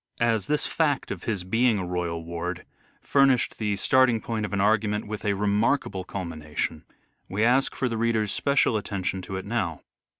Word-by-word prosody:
As 115 Hz, -4 st, +1 dB
this 150 Hz, 0 st, 0 dB
fact 145 Hz, -5 st, 0 dB
of -, -, -6 dB
his 105 Hz, -6 st, -1 dB
being 115 Hz, +4 st, +2 dB
a 95 Hz, -, -2 dB
royal 85 Hz, -2 st, -3 dB
ward 85 Hz, +1 st, -4 dB, 0.4 s
furnished 135 Hz, -3 st, +3 dB
the 105 Hz, -2 st, 0 dB
starting 125 Hz, +2 st, +3 dB
point 110 Hz, -1 st, -3 dB
of -, -, -12 dB
an 100 Hz, -, -1 dB
argument 105 Hz, 0 st, +2 dB
with 105 Hz, 0 st, -6 dB
a 105 Hz, -2 st, +1 dB
remarkable 105 Hz, 0 st, +1 dB
culmination, 80 Hz, -4 st, -4 dB, 0.4 s
we 100 Hz, +4 st, 0 dB
ask 125 Hz, +4 st, +3 dB
for 130 Hz, -, 0 dB
the 115 Hz, -2 st, -2 dB
reader's 110 Hz, -3 st, +1 dB
special 140 Hz, -5 st, +2 dB
attention 95 Hz, -2 st, -3 dB
to 95 Hz, +1 st, -6 dB
it 95 Hz, -, -5 dB
now. 95 Hz, -7 st, -2 dB
105 Hz, 175 wpm, -26 LUFS, 95-115 Hz, 0.4 s, furnished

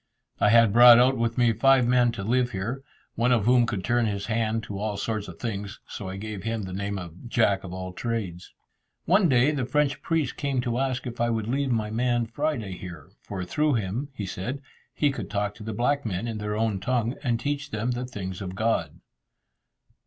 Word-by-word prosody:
I -, -, +4 dB
had 115 Hz, -2 st, +5 dB
brought 120 Hz, 0 st, +9 dB
out 130 Hz, +2 st, +5 dB
with 115 Hz, -1 st, -1 dB
me 120 Hz, -2 st, +4 dB
five 130 Hz, +3 st, +4 dB
men 125 Hz, -1 st, +4 dB
to 100 Hz, -, -5 dB
live 125 Hz, +3 st, +1 dB
here, 115 Hz, +8 st, -3 dB, 0.3 s
one 120 Hz, +2 st, +1 dB
of 115 Hz, -5 st, +3 dB
whom 120 Hz, -1 st, +4 dB
could 105 Hz, -5 st, -3 dB
turn 120 Hz, +2 st, +2 dB
his 100 Hz, -1 st, -3 dB
hand 110 Hz, 0 st, 0 dB
to 100 Hz, -2 st, -6 dB
all 105 Hz, -1 st, -2 dB
sorts 110 Hz, 0 st, -3 dB
of -, -, -10 dB
things, 100 Hz, -4 st, -5 dB
so 100 Hz, -3 st, -7 dB
I 95 Hz, -, -6 dB
gave 105 Hz, -1 st, -6 dB
him 115 Hz, +1 st, -2 dB
the 95 Hz, -1 st, -6 dB
name 100 Hz, +1 st, -3 dB
of 90 Hz, +5 st, -9 dB
"Jack 100 Hz, -5 st, +2 dB
of 95 Hz, -, -7 dB
all 95 Hz, 0 st, -6 dB
Trades." 100 Hz, -6 st, -4 dB, 0.5 s
One 185 Hz, 0 st, +4 dB
day 130 Hz, +2 st, +4 dB
the 140 Hz, -4 st, -1 dB
French 145 Hz, +2 st, 0 dB
priest 160 Hz, -6 st, -1 dB
came 140 Hz, -3 st, -1 dB
to 120 Hz, 0 st, -1 dB
ask 130 Hz, -1 st, -1 dB
if 120 Hz, -1 st, -5 dB
I 120 Hz, -, +2 dB
would 110 Hz, -2 st, -1 dB
leave 135 Hz, +3 st, 0 dB
my 110 Hz, -2 st, 0 dB
man 120 Hz, +1 st, +1 dB
Friday 115 Hz, -5 st, -2 dB
here, 85 Hz, -6 st, -9 dB
for 95 Hz, -3 st, -5 dB
through 150 Hz, -, +1 dB
him, 115 Hz, +7 st, -2 dB
he 105 Hz, -, -4 dB
said, 115 Hz, +10 st, -5 dB, 0.3 s
he 145 Hz, -2 st, +2 dB
could 135 Hz, -, -6 dB
talk 100 Hz, -1 st, -1 dB
to 105 Hz, -, -11 dB
the 110 Hz, -, -4 dB
black 130 Hz, +6 st, 0 dB
men 105 Hz, +1 st, -3 dB
in 110 Hz, -2 st, -4 dB
their 105 Hz, 0 st, -3 dB
own 110 Hz, -3 st, 0 dB
tongue, 120 Hz, +3 st, 0 dB
and 120 Hz, -5 st, 0 dB
teach 145 Hz, +1 st, -3 dB
them 110 Hz, +3 st, -2 dB
the 125 Hz, +1 st, -3 dB
things 95 Hz, -6 st, -6 dB
of 95 Hz, -1 st, -5 dB
God. 100 Hz, -7 st, -1 dB
115 Hz, 220 wpm, -26 LUFS, 100-125 Hz, 0.5 s, brought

